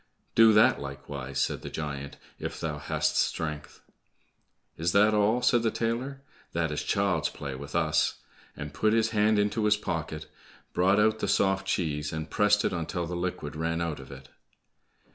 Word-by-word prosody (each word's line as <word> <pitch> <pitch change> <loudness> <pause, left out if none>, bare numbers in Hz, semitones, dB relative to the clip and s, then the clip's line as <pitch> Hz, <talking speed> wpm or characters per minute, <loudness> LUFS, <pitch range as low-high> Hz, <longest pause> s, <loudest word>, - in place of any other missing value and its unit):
"Do 115 -1 +7
that 105 -7 +5
likewise," 70 -1 -6
said - - 0
the - - -6
giant, 70 -2 -5 0.2
"if - - -5
thou 75 -2 -3
hast - - 0
strength?" 75 -2 -2 0.9
"Is 85 +2 -1
that 105 +2 +5
all?" 105 +4 +2
said 120 -1 +4
the 115 - +2
tailor, 120 +5 -2 0.3
"that 80 -2 0
is 75 - -2
child's - - +1
play 70 -2 -6
with 70 +2 -8
us!" - - +2 0.4
and 75 -1 -6
put 110 +8 +2
his 115 0 +2
hand 105 0 +3
into 105 +2 +1
his 105 0 +4
pocket, 80 -5 -4 0.5
brought 95 +3 +3
out 110 +1 +3
the - - -1
soft 95 -1 +2
cheese, 75 -5 -1
and 80 0 -5
pressed 105 0 +3
it - - 0
until 85 0 -2
the 90 +1 -5
liquid 85 -4 -4
ran 80 +1 -1
out 85 -4 -2
of 65 0 -11
it. 65 -1 -11
85 Hz, 175 wpm, -28 LUFS, 75-105 Hz, 0.9 s, Do